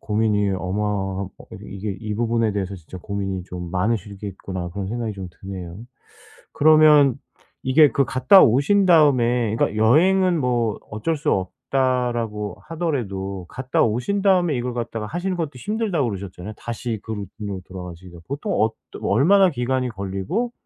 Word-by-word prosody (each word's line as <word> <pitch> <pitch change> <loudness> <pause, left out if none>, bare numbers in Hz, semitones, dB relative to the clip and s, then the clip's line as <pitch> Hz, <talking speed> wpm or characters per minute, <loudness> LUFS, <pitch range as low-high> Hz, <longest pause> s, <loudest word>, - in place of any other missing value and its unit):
고민이 105 -1 +1
어마하 95 0 -2
어 95 - -5 0.3
이게 - - -10 0.3
이게 95 - -5
'이 105 -2 -4
부분에 115 -1 +1
대해서 100 -1 -3
진짜 90 +1 -11
고민이 95 -1 -4
좀 90 -1 -7
많으시겠구나.' 95 -2 -3
그런 100 -1 -4
생각이 115 -1 -3
좀 95 -2 -7
드네요. 95 -2 -7 0.7
그러면 150 -3 +6 0.5
이게 145 +2 +6
그 140 - +2
갔다 130 +10 +6
오신 145 - +4
다음에 125 - +4
그러니까 105 - 0
'여행은 180 +9 +4
뭐 120 -4 0
어쩔 110 +10 -1
수 145 - -1
없다.'라고 115 -1 -1
하더라도 100 - -3
갔다 130 0 -1
오신 125 - 0
다음에 180 -6 +3
이걸 120 0 -3
갖다가 115 -2 -4
하시는 180 - -2
것도 160 -4 -3
'힘들다.'고 200 - -1
그러셨잖아요 95 0 -7
다시 120 -2 -4
그 110 - -6
루틴으로 100 -1 -6
돌아가시기가. 90 -1 -9
보통 145 +9 -3
어떠 110 0 -2
얼마나 185 - +4
기간이 130 -2 -1
걸리고 100 - -3
115 Hz, 360 characters per minute, -22 LUFS, 100-140 Hz, 0.7 s, 그러면